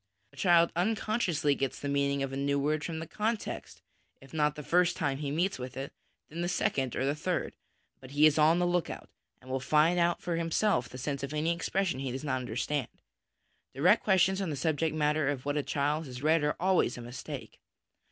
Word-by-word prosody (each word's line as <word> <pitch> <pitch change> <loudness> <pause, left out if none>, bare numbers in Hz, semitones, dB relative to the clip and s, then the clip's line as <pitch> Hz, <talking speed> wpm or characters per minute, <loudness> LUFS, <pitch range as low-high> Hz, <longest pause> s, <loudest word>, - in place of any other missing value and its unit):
A - - -17
child 170 -2 +4
unconsciously 185 -5 +1
gets 135 -1 -2
the 145 - -4
meaning 140 0 +1
of 135 0 -4
a - - -2
new 140 +1 0
word 150 +2 0
from 165 -2 -4
the 160 - -4
context, 215 +5 -4 0.4
if 135 +2 -17
not 150 -1 +1
the 150 - -7
first 175 +3 +2
time 140 -3 -1
he 145 -2 -3
meets 170 +3 0
with 130 +1 -7
it, 135 +1 -5 0.3
then 165 +3 -6
the 175 - -1
second 135 -8 0
or 130 - 0
the 140 - +1
third: 175 +4 -2 0.5
but 130 - -12
he 145 +2 +4
is 155 0 +4
on 155 +3 +5
the 180 - +2
look 175 -1 0
out, - - -8 0.3
and 130 - -9
will 130 - 0
find 155 +6 +3
out 170 0 +2
for 170 -2 -2
himself 165 - +1
the 130 - -9
sense 140 +2 -3
of 140 +2 -4
any 160 +3 +1
expression 170 -3 -1
he 135 -1 -3
does 130 +3 -5
not 135 -3 0
understand. 130 +3 -2 0.9
Direct 180 +11 +4
questions 190 -1 +3
on 190 - -2
the 150 - -2
subject 155 +2 0
matter 150 -1 +1
of 140 -2 -3
what 145 0 -1
a 150 - +1
child 145 +2 -1
has 125 +1 -8
read 160 0 +3
are 150 - +1
always 185 -8 +2
a - - -7
mistake. 120 +2 -8
150 Hz, 220 wpm, -30 LUFS, 140-170 Hz, 0.9 s, on